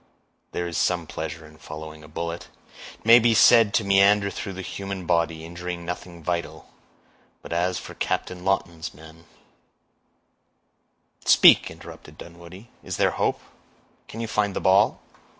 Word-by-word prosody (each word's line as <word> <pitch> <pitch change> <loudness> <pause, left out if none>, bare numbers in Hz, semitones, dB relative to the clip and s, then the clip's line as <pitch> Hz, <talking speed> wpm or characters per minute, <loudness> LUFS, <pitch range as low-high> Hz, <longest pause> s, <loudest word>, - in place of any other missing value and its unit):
there 85 - -3
is 85 - -3
some 90 -2 0
pleasure 80 +1 -7
in 75 0 -16
following 75 0 -10
a - - -13
bullet; 85 +2 -5 0.5
it - - -28
may 115 +1 +8
be 115 -1 +3
said 115 -1 +6
to 110 - +1
meander 100 +1 +4
through 95 - -6
the 95 +1 -7
human 95 -1 -6
body, 80 -1 0
injuring 85 0 -7
nothing 85 -1 -7
vital; 85 -2 -4 0.7
but - - -7
as 90 +2 0
for - - -9
Captain 90 -1 -3
Lawton's 85 -5 -2
men—" 80 +2 -15 2.0
"Speak," - - +6
interrupted - - -13
Dunwoodie; 85 +5 -13
"is - - -6
there - - +2
hope?—can 115 - -6
you 115 - -3
find 105 -3 -1
the - - -1
ball?" 95 +2 +3
90 Hz, 145 wpm, -24 LUFS, 80-100 Hz, 2.0 s, may